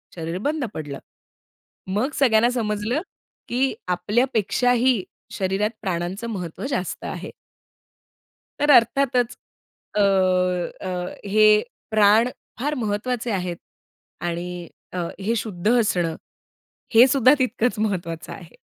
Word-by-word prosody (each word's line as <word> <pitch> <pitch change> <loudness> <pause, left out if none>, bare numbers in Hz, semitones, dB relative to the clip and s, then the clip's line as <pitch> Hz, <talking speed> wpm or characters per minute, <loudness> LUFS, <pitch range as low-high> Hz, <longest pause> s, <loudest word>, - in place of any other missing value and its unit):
शरीर 165 +1 -4
बंद 300 -3 -1
पडलं. 145 -3 -6 0.9
मग 215 +10 0
सगळ्यांना 235 -3 +4
समजलं, 220 +3 -1 0.5
की 260 +2 +1
आपल्यापेक्षाही 235 +4 +2 0.3
शरीरात 195 +2 0
प्राणांचं 185 +3 -3
महत्त्व 180 +1 -5
जास्त 185 -9 -3
आहे. - - -6 1.3
तर 295 0 +3
अर्थातच 245 0 +3 0.6
अ, - - +3
अ, 185 -1 +1
हे 215 +1 +5 0.3
प्राण 215 +2 +5 0.3
फार 295 +3 0
महत्त्वाचे 230 +1 -2
आहेत 180 -3 -2 0.7
आणि 175 0 -4 0.2
अ, 180 - -4 0.2
हे 220 +4 0
शुद्ध 205 -2 -2
असणं 175 -6 0 0.8
हे 240 +3 +9
सुद्धा 260 0 +5
तितकंच 245 -3 0
महत्वाचं 175 -6 -3
आहे. 170 -3 -12
210 Hz, 105 wpm, -23 LUFS, 180-240 Hz, 1.3 s, हे